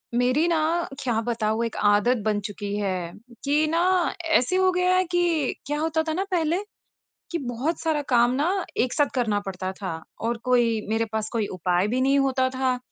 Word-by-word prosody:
मेरी 255 +7 +2
ना, 335 - +2 0.4
क्या 235 -3 0
बताऊँ 225 -1 0
एक 230 - -5 0.2
आदत 235 +5 +3
बन 210 -1 +1
चुकी 205 0 -5
है 185 -4 -2 0.3
कि 295 +2 +2
न - - +2 0.6
ऐसे 255 +9 -1
हो 375 0 +4
गया 360 0 +2
है 370 - +4
कि 345 -6 +1
क्या 295 +1 -2
होता 320 0 0
था 315 - 0
ना 370 +4 0
पहले 335 -1 +1 0.7
कि 340 - 0
बहुत 260 +8 -2
सारा 315 -3 0
काम 240 -1 +4
न - - +2 0.4
एक 250 - -2
साथ 290 - +3
करना 220 -5 +1
पड़ता 185 -1 -4
था 190 - -3 0.3
और 230 +1 -1
कोई, 240 -3 +2
मेरे 225 +1 +1
पास 220 -1 -2
कोई 220 -3 0
उपाय 180 +2 +1
भी 245 +4 0
नहीं 275 +2 +3
होता 265 -1 +2
था। 260 -1 0
250 Hz, 190 wpm, -25 LUFS, 220-305 Hz, 0.7 s, हो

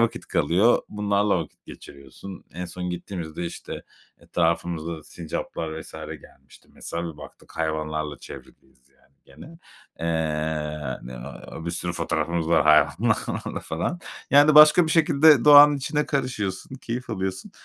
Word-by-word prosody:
vakit 115 0 0
kalıyor. 95 +10 +2
Bunlarla 105 -1 +1
vakit 80 -3 -9
geçiriyorsun." 70 +7 -12
En 90 +3 -5
son 90 +1 -5
gittiğimizde, 85 -2 -6
işte, - - -8 0.4
etrafımıza 85 -1 -2
sincaplar 80 0 -6
vs. - - -12 0.3
gelmişti. - - -20
Mesela 85 -1 -5
bir - - -21
baktık - - -14
hayvanlarla 75 -2 -3
çevriliyiz 65 -1 -14
yani 70 0 -32
gene. 165 +2 -14 0.4
Eee, 75 -3 -2
ne 65 +1 -9
na 80 - -10
bir - - -1
sürü 90 +1 -3
fotoğrafımız 85 0 -2
var 80 -2 +4
hayvanlarla 75 0 +1
falan. 80 - -3 0.3
Yani 145 +2 +6
başka 150 +3 +8
bir - - -2
şekilde 155 -4 +5
doğanın 145 0 +9
içine 150 +2 -2
karışıyorsun, 125 -6 -3
keyif 125 -1 -6
alıyorsun. 95 0 -4
85 Hz, 130 wpm, -24 LUFS, 80-115 Hz, 0.4 s, doğanın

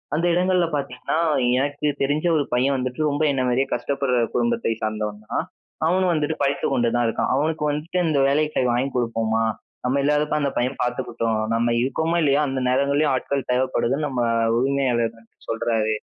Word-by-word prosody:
அந்த 170 - 0
இடங்கள்ல 180 0 +2
பாத்தீங்கன்னா, 140 0 -3 0.4
எனக்கு 145 +2 -1
தெரிஞ்ச 145 +4 0
ஒரு 145 - +2
பையன் 130 +3 +2
வந்துட்டு 125 +1 -4
ரொம்ப 145 +2 -1
என்ன 130 -2 0
மாரியே 130 +2 +2
கஷ்டப்படுற 140 -3 -1 0.2
குடும்பத்தை 235 - 0
சார்ந்தவன் 105 -1 -3
தான். - - 0 0.4
அவனும் 180 +2 +2
வந்துட்டு 155 0 0
படித்து 140 0 0
கொண்டு 120 -1 +2
தான் 120 - +2
இருக்கான். 115 - -1
அவனுக்கு 155 +2 0
வந்துட்டு 155 +5 -3
"இந்த 150 -3 +2
வேலைக்கு 150 +2 +1
போய் 125 -1 +2
வாங்கி 130 +3 0
கொடுப்போமா 115 -2 0 0.4
நம்ம 130 +3 +1
இல்லாதப்ப 150 +1 +1
அந்த 140 - +1
பையன் 125 +2 -1
பார்த்துக்கிட்டும். 115 -2 -1
நம்ம 115 +1 +1
இருக்கோமோ, 160 +7 0
இல்லையோ 145 -2 +3
அந்த 135 -1 -2
நேரங்களிலேயும் 140 +3 +2
ஆட்கள் 135 +1 -2
தேவைப்படுதுன்னு 130 +3 0
நம்ம 130 -3 -2 0.4
உரிமையாளர் 125 -3 +1 0.3
சொல்றாரு." 115 -1 0
135 Hz, 160 wpm, -23 LUFS, 120-150 Hz, 0.4 s, இல்லையோ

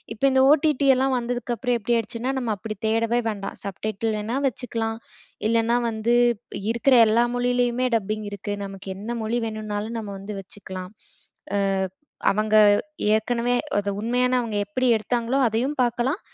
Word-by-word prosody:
இப்போ 235 - 0
இந்த 265 0 +4
ஓடிடி 295 -2 +3
எல்லாம் 265 +1 +1
வந்ததுக்கப்றம் 245 0 -1
எப்டி 235 +3 +1
ஆயிடுச்சுன்னா, 230 +3 -2
நம்ம 235 -4 -1
அப்படி 215 +2 -6
தேடவே 230 +2 +1
வேண்டாம். 200 -2 -5
சப்டைட்டில் 215 +2 -2
வேணா 225 +5 -2
வச்சுக்கலாம். 225 -3 -3 0.5
இல்லைனா 230 +1 +2
வந்து 225 +1 0 0.6
இருக்குற 235 +3 +2
எல்லா 230 +2 +4
மொழியிலயுமே 245 0 +1
டப்பிங் 215 0 -4
இருக்கு. 205 +1 -5
நமக்கு 195 0 -9
என்ன 210 +4 -7
மொழி 230 +2 0
வேணுனாலும் 215 0 -4
நம்ம 205 -2 -6
வந்து 200 +2 -7
வச்சுக்கலாம். 190 -1 -8 0.6
அ - - +2 0.7
அவங்க 215 +1 +1 0.6
ஏற்கனவே 235 +2 +1 0.2
அத 205 0 0
உண்மையான 250 +3 +1
அவுங்க 230 -3 -3
எப்படி 255 +6 -1
எடுத்தாங்களோ, 235 +3 -1
அதையும் 240 +6 -1
பாக்கலாம். 245 - 0
230 Hz, 140 wpm, -24 LUFS, 215-245 Hz, 0.7 s, இந்த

